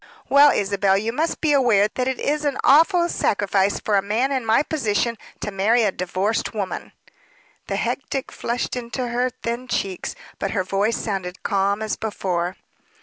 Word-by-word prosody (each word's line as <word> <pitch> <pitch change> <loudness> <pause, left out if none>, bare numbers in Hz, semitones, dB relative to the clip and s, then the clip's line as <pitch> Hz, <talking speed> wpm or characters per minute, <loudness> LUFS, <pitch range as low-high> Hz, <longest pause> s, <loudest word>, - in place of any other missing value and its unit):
"Well, 285 +1 +7
Isabel, 195 -2 +2
you 220 +3 -2
must 320 +6 -1
be 310 -2 +3
aware 235 -7 +4
that 255 0 -1
it 265 -1 -2
is 300 +1 0
an 285 -2 0
awful 340 +5 +5
sacrifice 200 - +1
for 210 -2 +1
a - - +3
man 225 +7 0
in 260 -3 0
my 225 +6 +4
position 235 -6 0 0.3
to 210 - -3
marry 215 +5 +2
a 205 - +2
divorced 190 +6 -2
woman." 200 -3 -4 0.7
The - - -2
hectic 270 - -3
flushed 240 +2 -3
into 245 +1 -4
her 245 +2 0
thin 240 +1 -5
cheeks, 195 -6 -3 0.2
but 195 - -1
her 185 - +2
voice 200 +4 0
sounded 190 -4 -4
calm 200 +2 0
as 215 - -2
before. 185 -4 -2
220 Hz, 170 wpm, -22 LUFS, 195-255 Hz, 0.7 s, Well